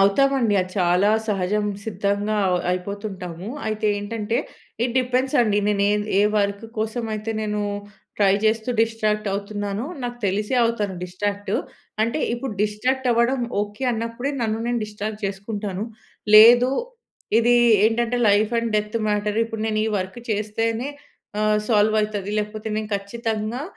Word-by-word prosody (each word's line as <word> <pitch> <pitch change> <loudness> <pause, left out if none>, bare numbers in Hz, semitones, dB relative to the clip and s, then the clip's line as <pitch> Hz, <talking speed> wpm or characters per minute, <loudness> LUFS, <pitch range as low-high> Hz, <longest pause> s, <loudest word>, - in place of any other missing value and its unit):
అవుతామండి. 235 +3 +3
అది 185 0 -4
చాలా 180 +3 +3 0.2
సహజం, 205 +1 0 0.2
సిద్ధంగా 205 0 -1
అవ్ 180 -1 +2
అయిపోతుంటాము. 185 -1 -5 0.2
అయితే 215 0 -1
ఏంటంటే 215 +2 -2 0.5
ఇట్ 245 0 -2
డిపెండ్స్ 255 +3 0
అండి, 210 -3 +2
నేను 200 -1 +1
ఏద్ 210 0 0
ఏ - - +5 0.2
వర్క్ 200 +1 -1
కోసం 220 +2 -2
అయితే 215 +1 -4
నేను 210 0 -2 0.6
ట్రై 195 -2 +5
చేస్తూ 220 +2 +1
డిస్‌ట్రాక్ట్ 215 -2 0
అవుతున్నానో, 205 +3 -3 0.2
నాకు 240 0 -4
తెలిసే 210 +5 -1
అవుతాను 210 -4 -1
డిస్‌ట్రాక్ట్. 200 +2 -3 0.5
అంటే 230 +7 0 0.2
ఇప్పుడు 250 0 -4
డిస్‌ట్రాక్ట్ 250 +5 0
అవ్వడం 235 +3 +2 0.2
ఓకె 210 +5 -4
అన్నప్పుడే, 230 +4 -3
నన్ను 220 0 0
నేను 240 0 0
డిస్‌ట్రాక్ట్ 210 +1 -6
చేసుకుంటాను. 200 0 -4 0.5
లేదు 240 +3 +8 0.7
ఇది 240 +1 +4 0.3
ఏంటంటే 235 +2 +1
లైఫ్ 205 +1 +3
అండ్ 230 -1 -1
డెత్ 210 +2 -1
మ్యాటర్. 210 +1 0
ఇప్పుడు 225 -1 -6
నేను 215 -1 0
ఈ - - +1
వర్క్ 190 +5 -5
చేస్తేనే 225 +4 -1 0.5
ఆహ్, 215 0 +3
సాల్వ్ 215 -1 +3
అయితది, 205 -2 -2
లేకపోతే 215 +1 -4
నేను 215 -1 -3
ఖచ్చితంగా 220 +4 -3
215 Hz, 140 wpm, -23 LUFS, 205-230 Hz, 0.7 s, లేదు